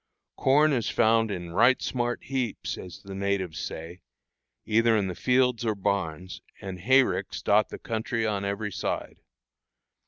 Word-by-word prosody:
Corn 150 +3 +4
is 120 -5 0
found 115 0 +3
in 90 -4 -5
"right 125 +9 +4
smart 120 -1 -2
heaps," 130 -5 -3
as 90 -2 -10
the 100 - -8
natives 95 -4 -2
say, 85 +3 -7 0.6
either 115 +1 +3
in 100 - +1
the 95 - -3
fields 125 +3 +2
or 110 -2 0
barns, 95 -3 -2 0.2
and 95 -2 -7
hayricks 105 -3 +2
dot 105 +1 +3
the - - -7
country 115 0 -2
on 100 -2 -1
every 100 +1 -2
side. - - -3
105 Hz, 150 wpm, -27 LUFS, 95-120 Hz, 0.6 s, Corn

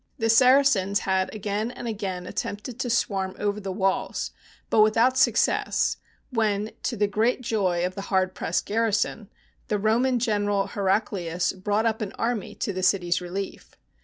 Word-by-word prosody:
The 225 -3 +2
Saracens 250 -5 +4
had 190 -1 0
again 210 +1 -2
and 245 -1 -7
again 195 -5 -4
attempted 215 +6 -5
to 245 - -2
swarm 195 -5 0
over 205 0 -1
the 195 -2 -5
walls, 190 0 -1 0.4
but 215 - +5
without 225 +4 +4
success, 265 - +2 0.3
when, 215 -3 0
to 235 - -2
the 205 - +3
great 220 +5 +1
joy 190 -7 0
of 180 - -3
the 195 - -6
hard 185 -1 +1
pressed 165 - -2
garrison, 225 -1 0 0.4
the 210 - 0
Roman 235 +5 +2
general, 205 -4 +1
Heraclius, 190 -3 -1
brought 205 +3 -1
up 220 -1 0
an 205 -1 -4
army 230 -2 -2
to 205 - -3
the 185 - -3
city's 180 -1 +2
relief. 190 +2 -6
205 Hz, 160 wpm, -25 LUFS, 190-225 Hz, 0.4 s, but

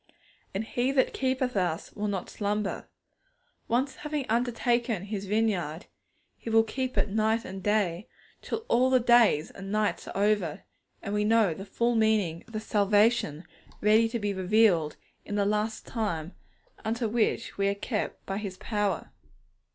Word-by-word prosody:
And 200 - 0
He 245 +3 0
that 260 -2 +2
keepeth 260 -2 0
us 175 -4 -1
will 210 +1 -3
not 195 -3 -3
slumber. 205 -1 -2 0.8
Once 260 +4 0
having 300 -3 -3
undertaken 235 -2 +1
His 200 -1 -5
vineyard, 190 -7 0 0.5
He - - -6
will 225 0 +5
keep 255 +3 -3
it - - +2
night 220 +2 +1
and 190 0 -7
day, 205 -2 0 0.3
till 450 - -4
all 250 +2 +3
the 260 -1 +5
days 235 -10 +4
and 195 0 -8
nights 215 0 0
are - - -6
over, 200 -6 +1 0.4
and 200 - -3
we 210 0 +1
know 215 -4 +3
the 190 +5 -8
full 235 +3 0
meaning 215 -7 +1
of 225 - -16
the 215 - -2
salvation 205 -5 +2 0.4
ready 220 +2 +4
to 235 - -2
be 205 -2 -1
revealed 185 -5 +3 0.3
in 205 - -5
the 200 -1 +2
last 210 +2 -1
time, 185 -8 -3 0.5
unto 230 +1 -1
which 225 0 0
we 195 - +3
are 200 - +1
kept 210 +1 -3
by 195 - -3
His 195 -3 -6
power. 205 -5 -2
215 Hz, 160 wpm, -28 LUFS, 195-230 Hz, 0.8 s, will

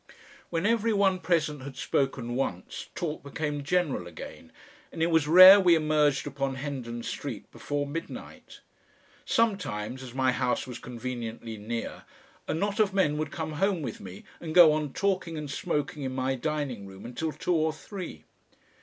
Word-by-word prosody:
When 165 +2 -1
every 225 0 +2
one 195 -2 +3
present 160 -4 0
had 135 0 -8
spoken 130 -3 -1
once 90 -9 -3
talk 160 -3 -3
became 145 +1 -3
general 150 - 0
again, 80 -1 -10 0.4
and 160 - -2
it 170 - +2
was 160 -2 +3
rare 185 +5 +11
we 180 -3 +6
emerged 150 -3 +2
upon 135 -1 -2
Hendon 130 -4 -5
Street - - -6
before 145 0 -3
midnight. 165 +4 -8 0.6
Sometimes, 145 - 0
as 130 -1 -9
my 130 -1 +3
house 125 -1 0
was 125 -3 -7
conveniently 120 -2 -6
near, 115 +2 -5 0.4
a - - 0
knot 200 +5 -1
of 205 -2 +2
men 150 -6 +2
would 155 -2 -2
come 160 0 -4
home 195 -5 +2
with - - -5
me 95 0 -10 0.2
and 160 -1 -6
go 175 -3 +9
on 150 -2 -2
talking 185 -3 -1
and 150 -2 -5
smoking 150 -3 -2
in 130 -1 -3
my 130 0 0
dining 135 -6 -3
room 95 0 -11
until 140 +7 -3
two 180 - -1
or 160 -1 +2
three. 160 - -8
150 Hz, 165 wpm, -28 LUFS, 130-170 Hz, 0.6 s, rare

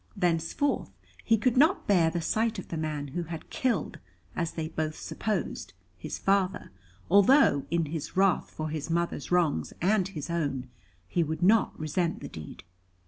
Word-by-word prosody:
Thenceforth 175 - 0 0.3
he 225 - +3
could 240 +3 +1
not 315 +8 +4
bear 175 -5 +4
the 170 +1 -2
sight 225 +3 0
of 190 - -7
the - - -4
man 155 -2 -3
who 175 +6 -3
had 165 -1 -7
killed, 235 - -1 0.4
as 165 -1 -2
they 160 -1 -3
both 155 -1 -3
supposed, 185 - -3 0.2
his 90 - -6
father, 195 0 0 0.4
although, 200 - +5
in 170 -1 +1
his 155 +3 -5
wrath 195 -1 +3
for 155 0 -5
his 155 0 -4
mother's 170 -4 -1
wrongs 160 - +1
and 190 +1 +2
his 170 -4 -6
own, 140 -6 -2 0.4
he 175 - 0
would 160 +1 -2
not 215 +4 +3
resent 165 +2 -1
the - - -7
deed. 80 +2 -9
170 Hz, 165 wpm, -28 LUFS, 155-195 Hz, 0.4 s, although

